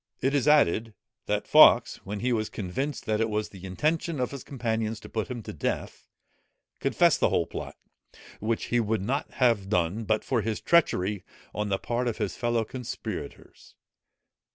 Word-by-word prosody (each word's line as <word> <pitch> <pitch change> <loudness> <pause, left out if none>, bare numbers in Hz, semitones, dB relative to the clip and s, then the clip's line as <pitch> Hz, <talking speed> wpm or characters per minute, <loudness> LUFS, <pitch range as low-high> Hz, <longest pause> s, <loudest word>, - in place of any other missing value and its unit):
It 135 +2 0
is 145 -1 +1
added, 115 - +3 0.3
that - - -1
Fawkes, - - +7
when 100 +1 -6
he 125 +1 +1
was 110 -2 -1
convinced 130 +9 -4
that 110 0 0
it 115 - +1
was 105 0 -2
the 95 -1 -11
intention 155 - -1
of 125 - -1
his 140 -2 -7
companions 115 -4 -2
to - - -11
put 110 -2 -2
him 120 -3 -6
to - - -7
death, - - -4 0.7
confessed - - +3
the - - +3
whole - - +1
plot, - - -7 0.6
which 110 +2 -1
he 120 - +4
would 110 -3 0
not 135 +7 -1
have 115 -6 +2
done, 90 +3 0
but 110 +1 +1
for 125 -4 0
this 110 0 -2
treachery 105 - +2 0.3
on 105 0 -2
the 95 - +1
part 120 +4 -2
of 115 - -2
his 105 -3 -2
fellow 120 -2 0
conspirators. 125 +1 -7
115 Hz, 175 wpm, -27 LUFS, 105-125 Hz, 0.7 s, Fawkes